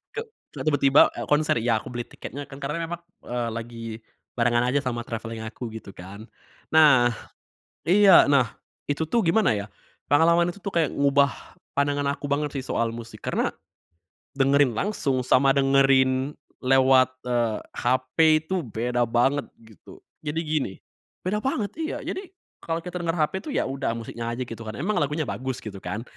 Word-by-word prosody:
Ke - - -2 0.4
tiba-tiba 145 -2 +5
e - - -4
konser, 150 -1 +2
iya 115 0 +2
aku - - -10
beli 120 -1 -4
tiketnya 145 +3 -8
kan 135 0 -11
karena 150 +4 -3
memang 175 0 -5 0.2
eee 120 -1 -2
lagi 115 0 -7 0.5
barengan 120 0 +2
aja 140 +3 +2
sama 120 -2 -2
travelling 115 -1 -6
aku, 115 +2 -6
gitu 110 -3 -9
kan. 95 +4 -10 0.5
Nah 145 -6 +6 0.8
iya, 195 +1 +7
nah 130 -6 +3 0.4
itu 145 +2 0
tuh 235 - +2
gimana 185 - +3
ya, 100 -1 -3 0.5
pengalaman 170 +3 +5
itu 200 - -15
tuh 200 - -3
kayak 165 -3 +2
ngubah 140 0 +3 0.5
pandangan 145 0 +1
aku - - -7
banget 145 0 0
sih 135 - -3
soal 115 -3 0
musik, 115 -2 -10
karena - - 0 0.9
dengerin 140 -1 +4
langsung 140 - 0
sama 135 +2 +4
dengerin 135 0 +3 0.3
lewat, 130 0 +5 0.2
eee, 120 -3 0 0.2
HP 130 +1 0 0.3
itu 190 - -2
beda 120 +1 -1
banget 130 +5 +2 0.2
gitu. 110 -2 -16 0.2
Jadi 150 +1 -2
gini 150 -10 -1 0.5
beda 195 +4 -1
banget 215 -3 -1
iya, 320 -1 -3
jadi - - -4 0.4
kalau 165 0 -3
kita 180 +1 -5
denger 165 -1 -1
HP 155 -3 +1
tuh 300 - -4
ya - - +2
udah 135 -3 -2
musiknya 115 0 -6
aja 130 - -4
gitu 115 -2 -7
kan, 110 - -5
emang 195 +9 -1
lagunya 150 +2 0
bagus, 130 0 -4
gitu 100 -3 -7
kan. 105 +5 -4
135 Hz, 165 wpm, -25 LUFS, 120-155 Hz, 0.9 s, iya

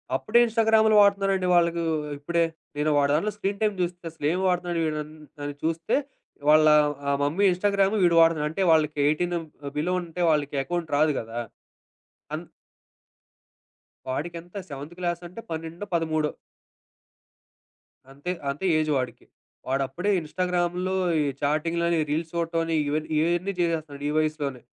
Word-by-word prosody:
అప్పుడే 240 - +3
ఇన్‍స్టాగ్రాములు 220 -1 +3
వాడుతున్నారండి 195 -2 +2
వాళ్ళకు 170 0 +3 0.4
ఇప్పుడే. 170 +4 0 0.3
నేను 150 +1 +1
వాడి 140 0 +3
దాంట్లో 210 +7 0
స్క్రీన్ 200 -1 -3
టైమ్ 210 -1 +2
చూస్తే 175 0 -2
అసలేం 160 +2 -1
వాడతున్నాడు 175 -1 0
వీడన్ 155 -1 -3 0.3
అని 145 0 -3
చూస్తే, 165 +1 0 0.5
వాళ్ళ 155 0 +7 0.4
ఆ - - +3
మమ్మీ 165 +8 +1
ఇన్‍స్టాగ్రామ్ 200 +2 +2
వీడు 170 -1 +4
వాడుతున్నాడు. 160 -2 +3
అంటే 195 - -3
వాళ్ళకి 155 -1 +2
18 175 +4 0 0.4
బిలో 175 +5 0
ఉంటే 175 +1 -6
వాళ్ళకి 145 -2 0
అకౌంట్ 175 0 -3
రాదు 155 0 +3
కదా! 115 +1 -6 1.0
అన్ - - -4 1.6
వాడికెంత 170 +7 -5
సెవెంత్ 145 +4 -8
క్లాసంటే 175 +3 -4
పన్నెండో, 165 +4 -5
పదమూడో. 155 -2 0 1.8
అంతే 145 +6 -5 0.2
అంతే 145 +7 -3
ఏజ్ 155 0 0
వాడికి. 125 -3 -4 0.4
వాడప్పుడే 135 +9 -1
ఇన్‍స్టాగ్రామ్‍లో 180 +2 -1 0.3
ఈ - - +2 0.2
చాటింగ్‍లని 165 +3 +1
రీల్స్ 160 +2 -1
చూడటం 165 0 0
అని, 165 - -1
ఇవన్ 155 +1 -1
ఇవన్నీ 175 +5 +1
చేసేస్తున్నాడు 155 -4 -2
ఈ - - -1
వయసులోనే. 150 -5 -1
165 Hz, 130 wpm, -25 LUFS, 150-180 Hz, 1.8 s, వాళ్ళ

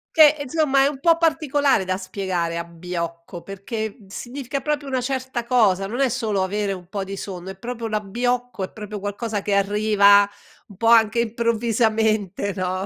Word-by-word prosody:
Che 305 -2 +7
insomma 280 -1 +2
è - - +4
un 285 -2 -4
po' 330 +3 +4
particolare 290 - +2
da 185 0 0
spiegare, 185 -3 -3
abbiocco, 170 0 -6
perché 205 +2 -5
significa 255 +6 -5
proprio 295 +1 -2
una 260 -2 -1
certa 260 -2 -3
cosa, 210 -6 +3
non 230 +6 -4
è 270 -2 +3
solo 220 -5 -1
avere 200 +1 -1
un 180 -2 -10
po' 200 -1 -3
di 195 +1 -6
sonno, 190 -1 -6
è 190 - -10
proprio 235 +2 -5
l'abbiocco, 235 +2 -2
è 185 - -5
proprio 210 -1 -7
qualcosa 205 +1 -3
che 205 - -1
arriva 205 0 +5 0.4
un 200 - -14
po' 230 - 0
anche 230 0 +5
improvvisamente, 220 -3 0
no? 185 0 -2
215 Hz, 170 wpm, -22 LUFS, 195-250 Hz, 0.4 s, Che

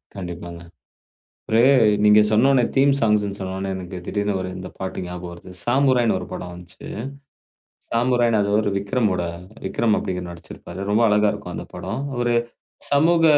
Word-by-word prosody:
கண்டிப்பாங்க. 85 -2 -7 0.9
ஒரு 110 +1 +4 0.4
நீங்க 105 0 +7
சொன்னொன்னே 125 +3 +4
தீம் 140 +1 +5
ஸாங்க்ஸ்ன்னு 105 -3 +1
சொன்னொன்னே 95 +1 -3
எனக்குத் 90 -1 -7
திடீர்ன்னு 100 -1 -1
1 90 - -4
இந்தப் 90 0 -9
பாட்டு 95 0 -4
ஞாபகம் 90 0 -7
வருது. 85 +1 -12
சாமுராய்ன்னு 125 -3 +3
1 90 - -7
படம் 90 -1 -6
வந்துச்சு. 90 0 -12 1.0
சாமுராய்ன்னு 120 -1 +2
அது 100 - -1
ஒரு 105 - -1
விக்ரமோட, 100 -2 0 0.4
விக்ரம் 115 -2 +1
அப்டீங்கிறவரு 90 -1 -4
நடிச்சிருப்பாரு. 85 +2 -10
ரொம்ப 110 +3 +3
அழகா 105 0 +3
இருக்கும் 100 -4 -7
அந்தப் - - -8
படம். 120 +5 -4 0.2
ஒரு 120 0 +1 0.6
சமூக 165 +4 +4
105 Hz, 145 wpm, -22 LUFS, 90-120 Hz, 1.0 s, நீங்க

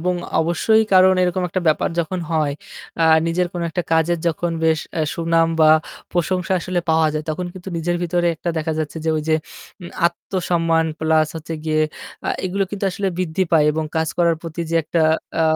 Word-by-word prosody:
এবং 180 +2 0 0.3
অবশ্যই 175 +7 +3
কারণ 185 0 +6
এরকম 180 +1 0
একটা 185 +2 -2
ব্যাপার 155 - +2
যখন 175 +2 -3
হয় 155 -3 +1 0.5
আ - - +5 0.2
নিজের 175 +2 +1
কোনো 175 -1 -3
একটা 175 +2 -2
কাজের 165 +1 +2
যখন 170 +1 -2
বেশ 160 -1 +3 0.2
আ - - +1
সুনাম 165 0 +2
বা 155 0 +7 0.4
প্রশংসা 180 +1 0
আসলে 180 0 -1
পাওয়া 160 -1 +3
যায় 155 0 -2
তখন 175 +3 -3
কিন্তু 185 0 -9
নিজের 175 +1 -1
ভিতরে 175 0 0
একটা 170 - -3
দেখা 160 +1 -2
যাচ্ছে 155 +1 -3
যে - - 0
ওই 155 - -2
যে 155 - +4 0.5
উম 170 - -7 0.2
আত্মসম্মান 170 -2 0
প্লাস 155 -1 +3
হচ্ছে 160 +1 -6
গিয়ে 155 0 +1 0.4
আ - - -1 0.2
এগুলো 195 +2 0
কিন্তু 200 -1 -4
আসলে 195 +1 -2
বৃদ্ধি 185 +1 0
পায় 155 -2 +5
এবং 155 +1 -2
কাজ 160 -1 +1
করার 170 -2 +3
প্রতি 165 0 -6
যে - - -1
একটা 165 +1 0 0.4
আ - - +4
165 Hz, 195 wpm, -20 LUFS, 160-180 Hz, 0.5 s, বা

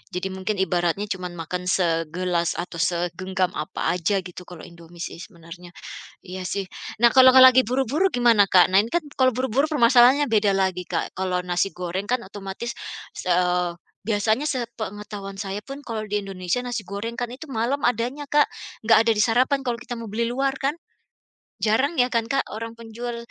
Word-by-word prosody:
jadi 180 +1 -2
mungkin 190 +3 -3
ibaratnya 180 +2 0
cuman 180 -1 -4
makan 175 +2 -5
segelas 170 0 0
atau 175 -1 -8
segenggam 175 +2 -1
apa 155 - -5 0.2
aja 190 +3 0
gitu 180 0 -10
kalo 175 -3 -10
Indomie 170 0 -14
sih - - -7
sebenarnya 175 -1 -12 0.5
iya 185 +1 -7
sih 200 -1 -2 0.4
nah 235 - +7
kalo 260 0 +8
lagi 260 0 +9
buru-buru 270 - +1
gimana 230 -5 +4
Kak? 180 -1 +7
Nah 190 - +8
ini 225 - -6
kan 345 - +1
kalo 260 -1 +5
buru-buru 260 +2 +1
permasalahannya 255 0 +5
beda 210 -2 +3
lagi 190 -2 0
Kak - - -2
kalo 180 -1 -1
nasi 175 +2 +1
goreng 180 +2 -4
kan 250 - +1
otomatis, 195 +4 -6 0.6
eee, 180 -1 +1 0.2
biasanya 220 +6 0
sepengetahuan 210 -6 -5
saya 195 0 -4
pun 275 +5 -10
kalo 220 -3 -5
di 205 0 -1
Indonesia 195 +4 -3
nasi 235 -6 -4
goreng 200 +4 -4
kan 245 - -2
itu 295 - -10
malam 240 +5 -1
adanya 245 +5 0
Kak, 295 0 +3 0.3
nggak 225 0 +4
ada 230 - +4
di 210 - -1
sarapan 250 +5 +2
kalo 245 -3 -2
kita 245 +2 -9
mau 230 - -7
beli 220 +3 -1
luar 270 +3 -1
kan? 275 +1 0 0.9
Jarang 260 +9 +2
ya 250 -1 +2
kan 230 -1 0
Kak 275 +3 +1
orang 230 +1 -6
penjual 235 +1 -6
210 Hz, 175 wpm, -23 LUFS, 180-245 Hz, 0.9 s, lagi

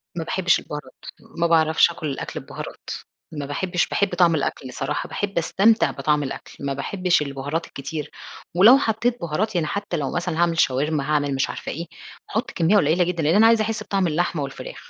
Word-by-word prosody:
ما 165 - -2
باحبش 180 +2 +2
البهارات، 150 0 -8 0.4
ما 170 0 +2
باعرفش 160 0 +4
آكل 160 -2 -5
الأكْل 135 - -4
ببهارات، - - -9 0.4
ما 145 -2 -4
باحبش 175 +5 -1
باحب 200 -3 0
طعم 175 -2 +4
الأكْل 130 -3 -3
صراحة، - - -3
باحب 200 -3 -3
أستمتع 215 +7 +3
بطعم 145 +1 0
الأكْل، 135 - -7
ما 140 - -1
باحبش 180 +4 0
البهارات 145 +3 -3
الكتير، 140 +2 -6 0.4
ولو 220 +9 +8
حطيت 235 -1 0
بهارات 180 +6 -2
يعني 160 -3 +1
حتى 200 -1 -3
لو 140 -2 -2
مثلًا 175 -2 -2
هاعمل 170 -1 +2
شاورما، 140 +3 +1
هاعمل 145 -2 +1
مش 135 - 0
عارفة - - -5
إيه، 170 +3 -5 0.4
هاحط 220 +3 -2
كمية 170 +4 +2
قليلة 170 0 +3
جدًا 170 -2 -2
لأن 160 +5 +3
أنا 225 +2 +7
عايزة 230 -1 +4
أحس 215 0 -3
بطعم 195 -4 0
اللحمة 165 -1 -1
والفراخ. 135 - -8
170 Hz, 185 wpm, -23 LUFS, 150-190 Hz, 0.4 s, ولو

